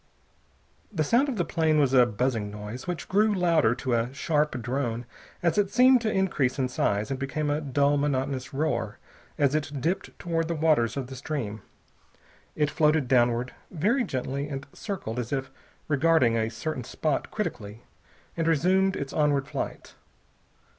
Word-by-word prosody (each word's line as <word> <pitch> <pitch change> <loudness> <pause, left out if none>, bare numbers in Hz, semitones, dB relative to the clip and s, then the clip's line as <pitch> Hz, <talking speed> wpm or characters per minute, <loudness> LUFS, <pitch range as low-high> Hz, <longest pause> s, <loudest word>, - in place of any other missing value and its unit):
The 165 -7 0
sound 245 - +3
of 260 - -2
the 175 -5 0
plane 160 -2 +2
was 135 -3 +2
a 125 -2 +6
buzzing 115 -1 -1
noise, 105 +6 -7
which 180 -2 -4
grew 210 +2 +3
louder 165 -10 +3
to 130 -1 -2
a 120 +1 0
sharp 150 -1 0
drone 120 -1 -2 0.4
as 170 +3 +2
it 200 -2 +2
seemed 250 +3 +5
to 220 -2 0
increase 170 -10 +1
in 130 -2 0
size, 105 0 0
and 135 - -2
became 145 +2 -2
a 150 +1 0
dull 145 0 +2
monotonous 135 -2 -1
roar 120 -6 -1 0.4
as 140 -3 +2
it 145 -2 -2
dipped 170 +8 -2
toward 165 -1 -1
the 170 - -2
waters 150 -7 +2
of 135 - -2
the 130 +1 -9
stream. 125 -6 -4 0.9
It 150 -1 +1
floated 155 -3 +2
downward, 120 0 +2 0.2
very 210 - +1
gently, 140 - -3
and 140 -1 -5
circled 150 - -5
as 120 -2 -4
if 135 -1 -2 0.4
regarding 145 -5 +3
a 110 -1 0
certain 140 +2 -4
spot 145 +4 -2
critically, 115 - -5 0.5
and 165 -1 -1
resumed 185 +4 +3
its 140 -1 -5
onward 145 -3 +2
flight. - - -5
145 Hz, 165 wpm, -27 LUFS, 125-165 Hz, 0.9 s, a